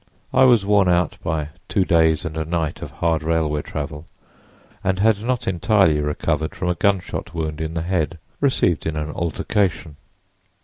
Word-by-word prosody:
I 130 Hz, -, +6 dB
was 120 Hz, -6 st, +5 dB
worn 100 Hz, -2 st, +4 dB
out 85 Hz, -2 st, +1 dB
by 75 Hz, -2 st, -2 dB, 0.2 s
two 95 Hz, -, +2 dB
days 80 Hz, -2 st, +3 dB
and 80 Hz, -1 st, -4 dB
a 80 Hz, -, -1 dB
night 80 Hz, -1 st, -2 dB
of -, -, -6 dB
hard 80 Hz, -2 st, 0 dB
railway 80 Hz, -2 st, 0 dB
travel 75 Hz, +2 st, -6 dB, 0.8 s
and 95 Hz, 0 st, +1 dB
had 105 Hz, +1 st, +3 dB
not 125 Hz, +1 st, -2 dB
entirely 95 Hz, -4 st, +3 dB
recovered 75 Hz, +1 st, -1 dB
from 90 Hz, -, -2 dB
a -, -, +3 dB
gunshot 95 Hz, -2 st, -1 dB
wound 80 Hz, -1 st, -3 dB
in 80 Hz, +1 st, -3 dB
the 80 Hz, -, -1 dB
head, 85 Hz, -3 st, -1 dB, 0.2 s
received 130 Hz, -, +1 dB
in 80 Hz, -, -2 dB
an 75 Hz, 0 st, -3 dB
altercation. 85 Hz, -1 st, -1 dB
85 Hz, 170 wpm, -21 LUFS, 80-95 Hz, 0.8 s, I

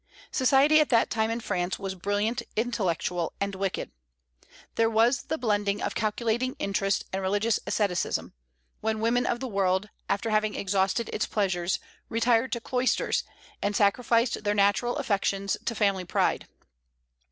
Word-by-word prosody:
Society 275 Hz, +3 st, +5 dB
at 305 Hz, -, +3 dB
that 230 Hz, -3 st, +3 dB
time 220 Hz, -1 st, +1 dB
in 230 Hz, +1 st, -1 dB
France 180 Hz, -5 st, -2 dB
was 195 Hz, -1 st, -4 dB
brilliant, 205 Hz, +5 st, -1 dB
intellectual, 180 Hz, -7 st, -1 dB
and 200 Hz, 0 st, -1 dB
wicked. 195 Hz, 0 st, -3 dB, 0.8 s
"There 225 Hz, 0 st, +2 dB
was 230 Hz, +3 st, +3 dB
the 315 Hz, -, -2 dB
blending 205 Hz, -5 st, 0 dB
of -, -, -2 dB
calculating 235 Hz, +3 st, -1 dB
interest 195 Hz, 0 st, 0 dB
and 190 Hz, -, -1 dB
religious 205 Hz, +4 st, +1 dB
asceticism," 200 Hz, -5 st, -1 dB, 0.5 s
when 220 Hz, 0 st, -1 dB
women 235 Hz, +3 st, +1 dB
of 240 Hz, -, 0 dB
the 260 Hz, -, -4 dB
world, 195 Hz, -1 st, 0 dB, 0.2 s
after 225 Hz, +2 st, 0 dB
having 215 Hz, 0 st, +1 dB
exhausted 195 Hz, +3 st, 0 dB
its -, -, -1 dB
pleasures, 190 Hz, -3 st, 0 dB, 0.3 s
retired 230 Hz, +1 st, +2 dB
to 235 Hz, -, -1 dB
cloisters, 250 Hz, +2 st, 0 dB, 0.4 s
and 205 Hz, 0 st, -1 dB
"sacrificed 230 Hz, +3 st, +2 dB
their 205 Hz, 0 st, +1 dB
natural 205 Hz, +4 st, +2 dB
affections 200 Hz, -7 st, 0 dB
to 230 Hz, -, -1 dB
family 200 Hz, -3 st, +1 dB
pride." 175 Hz, -, 0 dB
215 Hz, 145 wpm, -27 LUFS, 195-235 Hz, 0.8 s, Society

